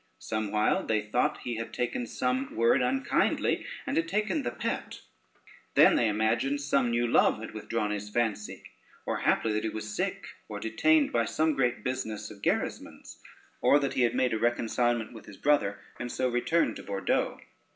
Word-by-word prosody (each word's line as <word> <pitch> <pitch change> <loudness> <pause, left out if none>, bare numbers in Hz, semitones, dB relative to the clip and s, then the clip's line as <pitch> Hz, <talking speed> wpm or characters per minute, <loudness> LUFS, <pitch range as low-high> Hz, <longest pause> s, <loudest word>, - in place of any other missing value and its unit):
Somewhile 110 -1 0
they 110 -1 +2
thought 125 +8 0
he 120 -2 -4
had 115 - -5
taken 120 0 -2
some 125 +3 -2
word 115 +3 +4
unkindly, 130 +2 +1 0.2
and - - -2
had 165 0 +1
taken 195 -4 0
the 120 - -2
pet; 120 - -4 0.7
then - - +7
they 115 - +3
imagined 115 +7 +1
some 140 -3 +1
new 120 +1 +1
love 115 - +4
had 110 - -7
withdrawn 110 0 -2
his 105 0 -4
fancy, 105 -2 -2 0.4
or - - -1
happily 110 - +1
that 105 - -1
he 110 - 0
was 110 -1 -6
sick, - - -2 0.2
or - - -5
detained 150 +7 +3
by 115 -1 +2
some 155 +7 +1
great 125 -3 0
business 120 -5 -3
of 100 -2 -13
Gerismond's, - - -3 0.4
or 145 - +6
that 140 -2 -1
he 135 - 0
had 120 0 +2
made 130 -1 +2
a 110 - 0
reconcilement 120 0 0
with 110 - -12
his 100 - -11
brother, 140 -9 +2 0.2
and 120 0 -4
so 130 - 0
returned 125 +7 +1
to - - -8
Bordeaux. 100 -1 -1
120 Hz, 180 wpm, -29 LUFS, 110-130 Hz, 0.7 s, then